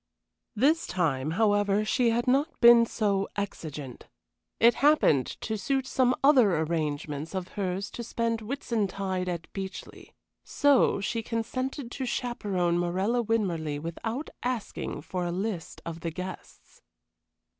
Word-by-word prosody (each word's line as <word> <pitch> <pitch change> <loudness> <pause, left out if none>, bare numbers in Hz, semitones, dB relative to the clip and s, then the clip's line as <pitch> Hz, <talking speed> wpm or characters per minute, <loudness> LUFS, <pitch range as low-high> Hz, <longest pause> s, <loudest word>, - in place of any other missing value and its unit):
This 295 +9 +2
time, 150 -6 0
however, 205 -1 +2
she 240 +2 +2
had 235 +1 +1
not 280 +5 +1
been 235 -1 +8
so 200 -4 0
exigent. 155 -10 -6 0.5
It 235 +1 +6
happened 280 - +4
to 220 -1 -3
suit 265 +6 0
some 255 -1 +2
other 250 - +5
arrangements 155 0 -2
of 185 -1 -3
hers 195 0 -3
to 240 - -6
spend 230 0 -1
Whitsuntide 200 -7 -2
at 170 -2 -4
Beechleigh, 190 -1 -7 0.3
so 280 -7 +3
she 225 +3 -1
consented 240 +3 -3
to 265 - -4
chaperon 195 -9 -1
Morella 190 +7 0
Winmarleigh 175 -10 -1
without 225 - -5
asking 245 -3 -4
for 180 -1 -3
a 175 - -2
list 185 -1 -4
of 170 0 -5
the 165 - -3
guests. 180 +3 -9
205 Hz, 130 wpm, -28 LUFS, 175-240 Hz, 0.5 s, been